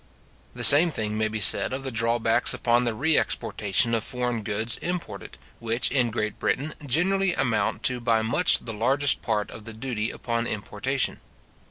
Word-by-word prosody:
The - - -6
same 160 +5 +11
thing 110 -7 -5
may 110 0 -1
be 110 0 -6
said 100 - +4
of 135 +1 -6
the 135 - -6
drawbacks 115 0 0
upon 120 +1 -1
the 115 -2 -3
re 155 +7 +1
exportation 105 +3 -2
of 115 -2 -1
foreign 125 -2 -3
goods 110 +3 -2
imported, 180 0 -7 0.2
which, 115 +1 -2
in 125 -3 0
Great 110 -1 -5
Britain, 145 +4 -3
generally 180 +7 -1
amount 125 -4 -2
to 125 -1 +1
by 115 -2 -1
much 115 +11 +1
the 115 - -5
largest 135 +6 +1
part 105 -3 -4
of 110 - -12
the 115 - -10
duty 115 -1 -5
upon 115 -1 -5
importation. 115 +6 -4
120 Hz, 175 wpm, -23 LUFS, 110-135 Hz, 0.2 s, same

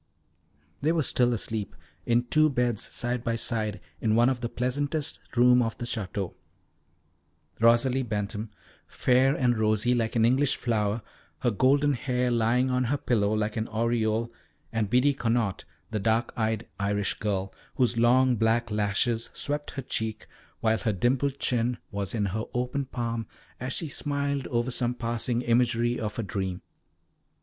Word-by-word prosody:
They 150 +3 +2
were 165 -2 +1
still 125 -1 +2
asleep, 110 -6 -3 0.3
in 120 +1 +3
two 155 +5 +3
beds 120 -5 0
side 120 0 -2
by 115 -1 0
side, 110 -3 -1 0.2
in 110 -1 +1
one 120 +2 +5
of 130 -2 -2
the 120 - -2
pleasantest 145 +5 -1 0.2
rooms 125 +1 +6
of 115 -1 -3
the 120 - -4
Château. 100 -5 -3 1.3
Rosalie 120 +3 +4
Bentham, 105 -2 -3 0.4
fair 130 +2 +3
and 120 -3 +1
rosy, 110 +2 +2
like 115 -1 0
an 115 -1 +4
English 130 +3 +3
flower, 110 -2 -1 0.4
her 120 - +2
golden 140 +6 +3
hair 125 -1 0
lying 120 +3 +2
on 125 0 +1
her 140 +5 0
pillow 105 -6 +1
like 110 0 0
an 110 +1 -1
aureole, 115 0 0 0.4
and 110 -3 0
Biddy 125 +5 +4
Connaught, 115 -6 -1 0.3
the 110 - -1
dark 110 +4 +1
eyed 110 -1 -1
Irish 100 0 -1
girl, 100 -2 -2 0.2
whose 125 -2 +2
long 125 +2 +4
black 115 +1 +1
lashes 105 +3 0
swept 145 +1 -3
her 135 - -3
cheek, 110 -2 -3 0.4
while 110 -1 +2
her 110 - 0
dimpled 130 +7 +1
chin 120 -2 0
was 100 +1 -3
in 105 -2 +1
her 110 +1 -2
open 125 +3 -1
palm, 115 -3 -3 0.3
as 130 +2 -4
she 160 - -3
smiled 140 -1 -2
over 120 +1 -1
some 120 0 0
passing 120 +1 -1
imagery 120 0 +2
of 105 -1 -3
her 115 - -2
dream. 95 -3 -3
120 Hz, 160 wpm, -27 LUFS, 110-125 Hz, 1.3 s, rooms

